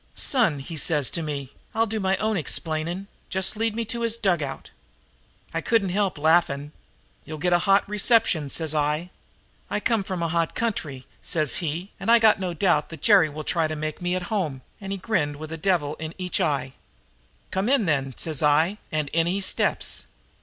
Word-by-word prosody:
Son,' 225 - +2
he 150 +5 -7
says 150 -4 +2
to 170 - -2
me, 145 -4 -4 0.2
'I'll 225 +1 +3
do 220 0 -3
my 190 -1 +1
own 215 +2 0
explaining. 165 +2 -1 0.2
Just 190 +1 +1
lead 225 0 0
me 230 0 -1
to 235 +2 -3
his 230 -1 +1
dugout.' 175 -11 -1 0.8
"I - - -1
couldn't 225 -5 +2
help 195 -1 0
laughing. 150 -2 +2 0.5
'You'll 155 - -7
get 175 +3 +1
a 175 - +5
hot 195 +1 +5
reception,' 210 - +2
says 160 +1 0
I. 150 +4 0 0.6
"'I - - -1
come 225 -5 +1
from 185 -3 -3
a - - +1
hot 165 0 0
country,' 155 - -3 0.2
says 155 -6 +1
he, 170 +4 -3
'and - - -3
I 235 - +8
got 220 -3 +5
no 180 -2 -3
doubt 170 -4 +2
that 160 -3 -10
Jerry 195 -7 +6
will 155 +1 -6
try 165 +1 +1
to 155 - -4
make 155 +1 -4
me 175 +1 0
at 185 - -2
home,' 150 -11 -2 0.2
and 195 -1 -6
he 195 - -2
grinned 170 -8 -1
with 155 +2 -8
a - - -3
devil 160 -4 +1
in 160 0 -6
each 185 +1 -2
eye. 140 -5 0 0.8
"'Come 195 +5 0
in, 270 -6 +3
then,' 135 -5 0
says 155 -4 -1
I, 155 +7 +3
and 155 -2 -1
in 165 +2 +1
he 190 +3 0
steps. 195 - 0
170 Hz, 195 wpm, -25 LUFS, 155-200 Hz, 0.8 s, I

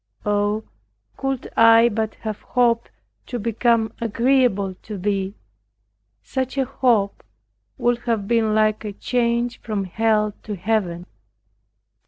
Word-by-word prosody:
Oh, 205 +1 +1 0.5
could 270 -2 -3
I 230 +1 +7
but 220 -1 -2
have 215 -2 -4
hoped, 235 -2 +1 0.4
to 245 - -3
become 230 0 +1
agreeable 230 -4 +2
to 210 -1 -7
Thee, 195 +1 -1 0.9
such 265 0 -3
a 270 - +2
hope 230 -6 +1 0.5
would 240 0 +1
have 225 -4 0
been 225 -2 +2
like 215 0 +2
a 210 -1 -5
change 235 +2 0
from 210 -4 -2
Hell 210 +2 +1
to 210 - -5
Heaven. 180 -3 -1
220 Hz, 120 wpm, -22 LUFS, 205-235 Hz, 0.9 s, I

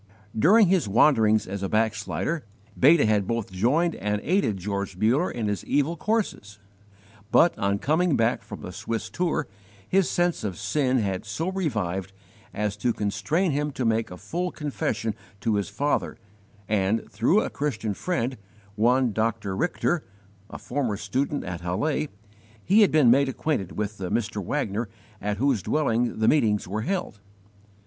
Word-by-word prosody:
During 205 - +6
his 180 - +2
wanderings 110 -1 +4
as 100 +1 -5
a 95 - -2
backslider, 110 +8 -1 0.3
Beta 150 +2 +5
had 105 -3 +2
both 115 -3 -2
joined 140 - +2
and 105 +1 -2
aided 175 - +1
George 100 0 -4
Muller 120 - +2
in 115 -3 -3
his 105 -3 -2
evil 145 +4 +1
courses, 190 - -2 0.7
but, 170 - +5
on 100 0 +1
coming 155 - +2
back 115 0 +1
from 100 - -9
the 90 - -7
Swiss 110 +5 -4
tour, 170 -5 -1 0.4
his 190 -1 +2
sense 175 -1 0
of 95 -5 -3
sin 130 -4 +1
had 95 -5 -1
so 115 - -3
revived 100 - -2 0.4
as 105 -1 -2
to 120 +2 0
constrain 105 - 0
him 145 +1 0
to 130 - -2
make 115 0 +1
a 90 - -9
full 175 - -3
confession 145 -8 -2 0.3
to 110 - +1
his 100 -1 -1
father; 145 +8 -1 0.5
and, 105 +1 0
through 125 - +3
a - - -3
Christian 110 -8 -2
friend, 130 - -2 0.4
one 120 +3 +2
Dr. 110 -3 -1
Richter, 175 - 0 0.5
a - - -7
former 125 -6 -2
student 135 +8 -2
at 90 -1 -5
Halle, 140 - -1 0.6
he 205 +5 +5
had 205 - +5
been 150 -6 +5
made 135 +2 +4
acquainted 130 - -2
with 105 0 -3
the 90 -2 -3
Mr. 110 -3 -1
Wagner 110 -2 -2 0.3
at 105 0 -2
whose 130 -3 +1
dwelling 120 -4 0
the 110 0 +1
meetings 110 -11 +3
were 105 +4 -2
held. 175 - -3
115 Hz, 160 wpm, -25 LUFS, 105-150 Hz, 0.7 s, During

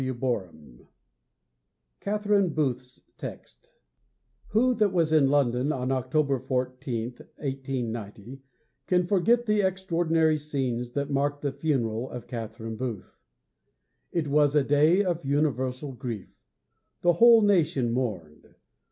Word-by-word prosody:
XVIII 100 - -4 1.1
CATHERINE 205 -2 +1
BOOTH'S 125 -4 -2 0.2
TEXT - - -9
I - - -41 0.7
Who 250 +4 +3
that 210 -4 +2
was 165 -4 +1
in 145 -4 +5
London 135 -1 +2
on 130 -2 -2
October 135 +1 0
14, 125 -2 -3
1890, 125 -3 -6 0.5
can 180 -1 +2
forget 220 +6 +2
the 210 -2 +2
extraordinary 165 -4 +1
scenes 130 -5 -3
that 140 0 -2
marked 145 +1 -1
the 140 - 0
funeral 130 -5 -1
of 125 - -8
Catherine 115 -1 -6
Booth? 120 -6 -5 1.0
It 165 -3 -1
was 145 0 +3
a 145 - +4
day 155 +8 +4
of 175 -3 -2
universal 135 -1 -1
grief. 120 -6 -7 0.7
The 175 0 +4
whole 230 +4 +7
nation 165 - +2
mourned. 95 -12 -4
140 Hz, 115 wpm, -27 LUFS, 125-165 Hz, 1.1 s, whole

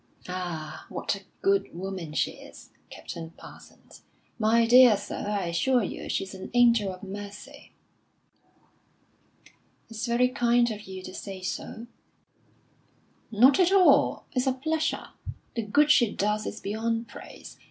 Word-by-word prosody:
"Ah, 165 -4 -6
what - - -2
a 200 - -10 0.2
good 195 -3 +1
woman 185 -4 -5
she 155 - 0
is, - - -14 0.2
Captain 165 -1 -8
Parsons. - - -15 0.4
My 225 +1 +3
dear 245 -2 +7
sir, 205 0 -6
I 200 -3 -1
assure 245 +8 +2
you - - -6
she's 195 0 -2
an 190 - -8
angel 235 -5 +4
of 185 +1 -11
mercy." 205 +1 -9 2.2
"It's 225 0 -4
very 240 +2 +3
kind 240 -2 +2
of 210 -2 -8
you 190 -1 -8
to 185 - -9
say 190 -1 -8
so." 225 +4 -5 1.4
"Not 245 - +5
at 365 0 +4
all! 390 -2 +4
It's 255 0 -1
a 260 - +3
pleasure. 315 +4 -2 0.5
The 230 - 0
good 290 +8 +3
she 240 -7 +4
does 210 +1 -1
is 215 - -6
beyond 225 +3 -2
praise. - - -12
215 Hz, 140 wpm, -27 LUFS, 190-245 Hz, 2.2 s, dear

